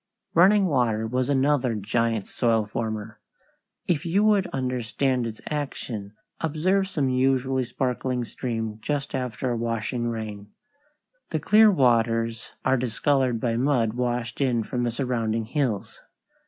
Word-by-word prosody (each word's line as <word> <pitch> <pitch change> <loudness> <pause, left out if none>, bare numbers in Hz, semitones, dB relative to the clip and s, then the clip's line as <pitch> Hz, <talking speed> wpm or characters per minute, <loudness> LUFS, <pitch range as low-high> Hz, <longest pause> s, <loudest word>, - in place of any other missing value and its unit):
Running 195 +4 +5
water 120 -9 +1
was 125 +3 -1
another 135 -3 +2
giant 110 0 0
soil 115 -3 +1
former. 110 0 -4 0.7
If 165 -3 0
you 185 +4 +2
would 210 -3 +3
understand 125 0 -1
its 110 -1 -8
action, 120 -8 -4 0.3
observe 180 +5 +1
some 145 -8 0
usually 130 0 +1
sparkling 125 0 -2
stream 115 -2 -4
just 145 +1 -2
after 125 -1 -2
a - - 0
washing 115 +1 -2
rain. 105 -3 -5 0.8
The - - -1
clear 215 +1 +6
waters 115 - +2 0.2
are 130 0 +3
discolored 125 +1 +1
by 115 -1 0
mud 120 -4 +2
washed 120 0 -2
in 120 -4 +2
from 120 +2 -2
the 120 - 0
surrounding 115 -3 -1
hills. 125 -5 -2
125 Hz, 130 wpm, -25 LUFS, 115-135 Hz, 0.8 s, clear